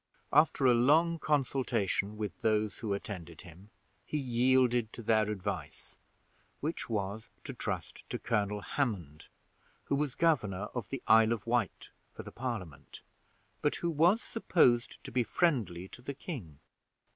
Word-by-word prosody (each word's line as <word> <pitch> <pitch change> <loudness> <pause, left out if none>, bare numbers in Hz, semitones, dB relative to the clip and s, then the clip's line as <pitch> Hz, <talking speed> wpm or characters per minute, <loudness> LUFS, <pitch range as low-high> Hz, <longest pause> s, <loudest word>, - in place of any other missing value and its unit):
After 150 -3 +4
a 125 - +7
long 160 +8 +4
consultation 125 -9 0
with 105 -4 -4
those 110 -1 +1
who 110 -3 -3
attended 85 -5 -7
him, 90 +3 -14 0.3
he 150 - -3
yielded 125 -3 +2
to 120 - -7
their 110 -1 +3
advice, 100 -3 -5 0.6
which 155 -2 -2
was, 105 0 -3
to - - -4
trust - - -4
to - - -2
Colonel 105 -2 -1
Hammond, 95 - -3 0.6
who - - 0
was 145 -2 -1
governor 105 - +1
of 120 -5 -4
the 135 -2 -5
Isle 110 0 +6
of 110 -4 -5
Wight 115 -4 -1 0.2
for - - -9
the - - -9
Parliament, 95 - -6 0.6
but 150 - +2
who 170 - -1
was 170 +9 +4
supposed 125 - +2
to - - -8
be 125 - +2
friendly 110 - 0
to - - -10
the 140 +2 -6
king. 115 - -7
115 Hz, 145 wpm, -31 LUFS, 100-135 Hz, 0.6 s, a